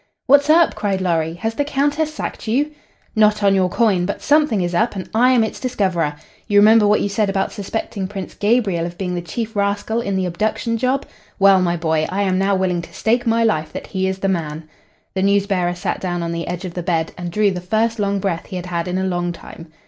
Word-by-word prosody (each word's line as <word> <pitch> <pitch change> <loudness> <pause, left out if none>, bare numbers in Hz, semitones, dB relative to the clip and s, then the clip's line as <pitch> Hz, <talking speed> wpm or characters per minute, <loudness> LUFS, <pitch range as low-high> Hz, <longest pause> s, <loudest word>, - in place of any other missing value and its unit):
"What's 285 +2 +5
up?" 330 +2 +5
cried 200 -2 -1
Lorry. 165 -3 0
"Has 225 +5 -3
the 290 - 0
Countess 290 +2 0
sacked 305 - -6
you?" 280 +7 +1 0.4
"Not 210 -1 +3
on 200 -1 +5
your 190 -1 +2
coin! 190 -4 +2
But 200 - -3
something 295 -9 +3
is 175 0 -2
up, 220 +5 +1
and 190 - -5
I 240 +3 +4
am 250 -3 +4
its 220 - -4
discoverer. 185 - -1 0.3
You 205 -2 +2
remember 215 +1 +6
what 210 +1 +3
you - - 0
said 205 0 0
about 195 0 -1
suspecting 200 -1 -4
Prince 195 -1 -7
Gabriel 205 -6 +1
of 175 0 -10
being 180 -2 -3
the 175 - -2
chief 220 +7 -5
rascal 205 +3 0
in 200 -4 -2
the 190 -1 0
abduction 215 +6 -1
job? 260 +3 0 0.3
Well, 195 -1 +5
my 175 -1 +1
boy, 160 -1 0
I 200 +2 -1
am 185 -1 +1
now 195 +1 +2
willing 185 -2 0
to 170 - -12
stake 235 +2 0
my 230 0 +3
life 160 -9 0
that - - -6
he 190 -1 -2
is 190 0 -2
the 195 - -2
man." 160 -4 -3 0.5
The 190 - -1
news 200 0 +3
bearer 180 -3 0
sat 175 - -3
down 175 -2 -2
on 170 - -3
the 170 0 -4
edge 180 +2 -4
of 180 - -6
the 175 - -4
bed 165 -2 -1
and 175 -1 -5
drew 205 +3 +2
the 180 -1 -4
first 220 +5 0
long 200 -1 0
breath 190 -4 -2
he - - -7
had 180 -1 -4
had 170 -1 -3
in 180 +1 -2
a 190 - -1
long 175 -2 -1
time. 165 -1 -11
195 Hz, 240 wpm, -20 LUFS, 175-220 Hz, 0.5 s, remember